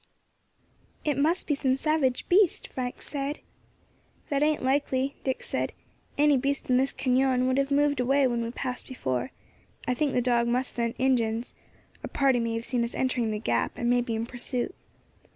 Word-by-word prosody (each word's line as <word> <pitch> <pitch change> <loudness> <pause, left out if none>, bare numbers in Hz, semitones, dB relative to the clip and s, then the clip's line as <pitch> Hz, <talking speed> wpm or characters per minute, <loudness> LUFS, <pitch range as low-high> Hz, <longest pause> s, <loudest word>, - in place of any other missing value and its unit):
"It 295 -2 +1
must 315 +7 +1
be 295 - +1
some 265 -2 +1
savage 280 -4 +1
beast," 370 -1 +3
Frank 250 -1 -5
said. 285 0 -3 0.9
"That 280 -1 +1
ain't 300 -1 +2
likely," 270 0 +1
Dick 265 -1 -2
said; - - -2 0.4
"any 295 -1 +5
beast 275 0 -1
in 250 - +5
this 265 +1 +2
cañon 255 -1 +2
would 260 +1 +2
have 275 0 +1
moved 285 -1 +2
away 270 +3 +3
when 240 -2 +1
we 230 - -2
passed 250 +1 -5
before. 130 - -2 0.6
I 250 - +2
think 285 +2 0
the - - +2
dog 235 -1 +2
must 250 +2 0
scent 235 -1 -1
Injins. 235 -3 +1 0.5
A - - -3
party 270 -3 +2
may 230 -1 -1
have 230 +1 -3
seen 245 -2 0
us 235 - -4
entering 255 -3 0
the 215 - -1
gap, 120 - -1
and 240 0 +1
may 245 0 +4
be 235 -2 -2
in 225 +1 -2
pursuit." 250 +5 -3
260 Hz, 185 wpm, -27 LUFS, 240-280 Hz, 0.9 s, any